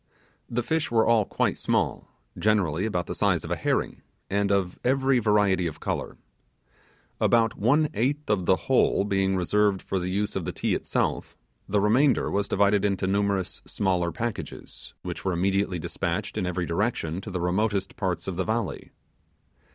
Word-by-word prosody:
The 120 +1 -1
fish 160 +3 0
were 115 -1 +3
all 115 -2 +4
quite - - -1
small, - - 0 0.3
generally 100 -3 +1
about 90 -5 -1
the - - -4
size - - +1
of - - -6
a - - +2
herring, - - -1 0.3
and 100 0 +1
of 95 -3 0
every 135 0 +3
variety. 105 -5 +2 1.5
About 115 -1 +3
one 145 +8 +3
eighth 140 +7 -1
of 95 -4 0
the 95 - +6
whole - - +3
being 95 -1 +1
reserved 100 +2 +2
for 95 - -3
the 90 +1 -3
use 100 +2 -1
of 95 - -2
the - - -3
Ti - - -1
itself, - - -2 0.3
the 105 - +2
remainder 125 +7 +3
was 100 0 0
divided 100 0 +2
into 100 -2 0
numerous 100 -1 0
smaller 90 -3 0
packages, 120 +1 -6
which - - -5
were 95 - 0
immediately 95 +1 0
dispatched 80 - -3
in 90 - -1
every 90 0 -2
direction 90 -2 -1
to 105 - -8
the 95 -2 -3
remotest 95 +2 0
parts 95 -4 -2
of 95 -3 -3
the 95 - +1
valley. 115 +3 -3
100 Hz, 165 wpm, -26 LUFS, 95-110 Hz, 1.5 s, the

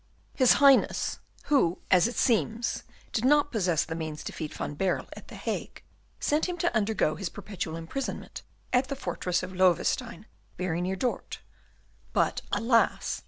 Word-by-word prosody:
His 255 -3 +5
Highness, 275 -2 +4 0.2
who, 190 - +2
as 185 +2 +6
it 240 - -5
seems, 230 0 +1 0.3
did 225 - -1
not 290 +2 +4
possess 180 -8 +1
the 160 - -5
means 155 -2 -5
to - - -5
feed 155 -2 -5
Van - - -4
Baerle 185 +5 -1
at - - -12
the - - -10
Hague, - - -5 0.4
sent 305 +4 +1
him 355 - -3
to 345 -5 0
undergo 210 -7 +1
his 170 +3 -4
perpetual 175 -5 -5
imprisonment 165 +12 -5 0.3
at 255 +1 +3
the 275 - -3
fortress 180 -9 -2
of 185 +1 -6
Loewestein, 185 +6 +1 0.3
very 175 -2 -1
near 185 +2 -1
Dort, 245 +5 -3 0.7
but, - - +1
alas! 230 0 +2
210 Hz, 160 wpm, -28 LUFS, 175-255 Hz, 0.7 s, as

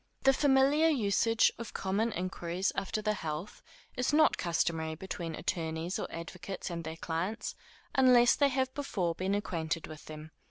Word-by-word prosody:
The 270 - +6
familiar 280 +3 +4
usage 225 -5 +3
of 230 - -7
common 205 +4 0
inquiries 180 0 -2
after 210 +2 -2
the 215 0 +2
health 165 +1 -5 0.3
is 250 +3 0
not 310 +1 +5
customary 165 -2 -1
between 170 -2 -5
attorneys 165 +1 -2
or - - -3
advocates 180 +3 -6
and 170 -1 -4
their 160 0 -6
clients, 170 +7 -3 0.4
unless 250 -2 +6
they 285 -1 +3
have 260 0 0
before 190 -12 -1
been 190 +3 -1
acquainted 165 -5 -2
with 155 -1 -10
them. 155 0 -9
190 Hz, 155 wpm, -31 LUFS, 165-240 Hz, 0.4 s, The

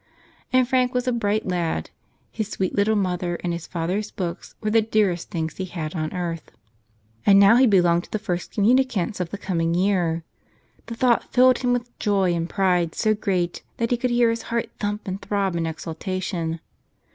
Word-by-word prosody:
And 255 -1 +4
Frank 255 -1 +1
was 250 0 0
a - - +3
bright 215 -3 0
lad. 170 - -2 0.4
His 220 -2 -3
sweet 190 -3 -2
little 205 +2 +2
mother 180 -3 -1
and 175 -1 -1
his 170 -1 -6
father's 185 +5 -2
books 175 -2 -5
were 215 -1 -2
the 225 +1 +5
dearest 210 -6 0
things 160 -2 -3
he 190 - -3
had 160 -4 -5
on 155 -3 -3
earth. 170 -3 -4 0.7
And 200 -1 +6
now 200 +4 +7
he 260 0 +6
belonged 175 -4 +3
to - - -22
the - - 0
first 180 -4 -3
communicants 230 -2 +2
of 180 -2 -2
the 205 - -5
coming 170 -4 -1
year. 175 -3 +1 0.6
The 230 - -5
thought 240 0 +2
filled 255 +1 +5
him 250 -1 0
with 245 0 -3
joy 195 -4 +2
and 170 0 -2
pride 180 -4 +1
so 215 -1 +2
great 185 -4 -1 0.2
that 230 0 -1
he 245 - +3
could 250 +1 -1
hear 240 -1 +3
his 230 - -3
heart 235 0 -1
thump 205 0 -3
and 190 +2 -4
throb 195 -3 -1
in 165 -1 -1
exultation. 165 +1 -4
195 Hz, 190 wpm, -23 LUFS, 175-225 Hz, 0.7 s, now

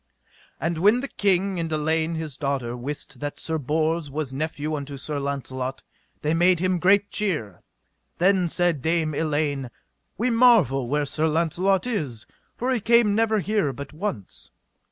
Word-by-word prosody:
And 165 0 -1
when 210 +7 +4
the 275 - -3
king 195 -4 +1
and 165 -1 -3
Elaine 160 +2 0
his 160 -4 -5
daughter 135 -5 -2
wist 140 +4 -6
that 145 0 -5
Sir 160 -1 -2
Bors 155 +2 0
was 140 -1 -4
nephew 155 +1 -3
unto 140 -1 -6
Sir 145 +2 -4
Launcelot, 135 -2 -4 0.4
they 150 +1 +1
made 175 +1 +4
him 185 0 +1
great 200 +3 +3
cheer. 150 - -2 0.6
Then 185 -1 +3
said 175 -4 +1
Dame 160 0 0
Elaine: 145 -4 -1 0.5
We 245 +3 +1
marvel 220 - +4
where 145 +3 0
Sir 155 +3 0
Launcelot 170 +5 +1
is, 145 - -3 0.3
for 250 +2 -1
he 250 - +1
came 235 -1 +4
never 220 -1 +2
here 205 -7 0
but 140 +3 -8
once. 125 - -5
160 Hz, 155 wpm, -24 LUFS, 140-190 Hz, 0.6 s, when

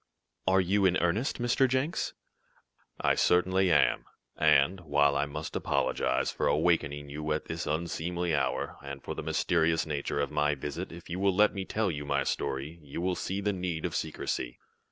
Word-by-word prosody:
"Are 95 +1 +5
you 95 +2 +3
in 90 0 +2
earnest, 100 +12 0
Mr. 120 +2 +3
Jenks?" 130 +6 -1 0.9
"I - - +3
certainly 95 +1 +3
am, - - +3 0.3
and, 95 +1 +4
while 75 -3 +2
I 70 +1 +1
must 75 +2 -6
apologize - - 0
for - - -1
awakening 75 -3 +1
you 75 +1 -4
at 75 - -3
this 80 +1 -4
unseemly 85 +2 -1
hour, - - -1
and 70 0 -8
for - - -4
the - - -5
mysterious 80 -1 +1
nature 70 -2 -2
of 70 -1 -1
my 75 0 +1
visit, 75 +6 -5
if 85 +1 -11
you 90 +2 -4
will 100 -1 +2
let 105 +2 +4
me 95 -2 -4
tell 110 -2 0
my 70 -2 -1
story, 70 +5 -3
you 70 +1 -7
will 90 +1 0
see 95 +3 -3
the 105 0 0
need 90 -4 -3
of - - -2
secrecy." - - -3
85 Hz, 175 wpm, -29 LUFS, 75-95 Hz, 0.9 s, Are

